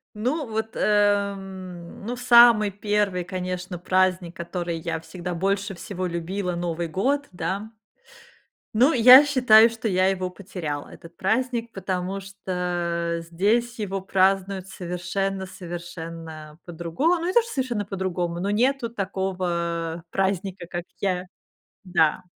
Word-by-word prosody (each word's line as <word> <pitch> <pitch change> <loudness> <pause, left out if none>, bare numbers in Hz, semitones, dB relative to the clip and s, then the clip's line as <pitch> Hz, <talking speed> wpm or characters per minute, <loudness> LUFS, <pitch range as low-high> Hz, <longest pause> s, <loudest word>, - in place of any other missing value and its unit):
Ну, 260 +7 -1
вот, 220 0 -3
эм, 195 -4 -1
ну, 245 - -2
самый 235 -4 +6
первый, 205 -2 0
конечно, 180 0 -4
праздник, 185 0 +1
который 170 -1 -4
я 165 0 -3
всегда 180 +1 -6
больше 195 +2 -1
всего 185 +1 -4
любила,- 180 +2 -3
Новый 170 -1 -2
год, 275 - 0
да. 190 +5 -3 1.1
Ну, 255 +8 +5
я 255 +3 +9
считаю, 245 -6 +6
что 225 0 -4
я 185 -2 +3
его 185 -1 -1
потеряла, 175 -6 -6
этот 170 0 -14
праздник, 235 +3 0
потому 190 0 -3
что 175 -3 -2
здесь 230 +7 +1
его 195 -2 -2
празднуют 190 0 +1
совершенно 190 +1 -3
совершенно 165 -3 -8
по-другому. 175 - 0
Ну, 335 -1 -3
не 365 - -1
то 475 - +6
что 465 - -9
совершенно 250 -6 -1
по-другому, 180 -3 -3
ну, 195 +3 -1
нету 245 +3 +1
такого 175 -5 -2
праздника, 190 -2 -1
как 175 -1 -4 0.2
я 185 -2 0 0.6
Да. 175 -2 +2
190 Hz, 125 wpm, -24 LUFS, 175-210 Hz, 1.1 s, я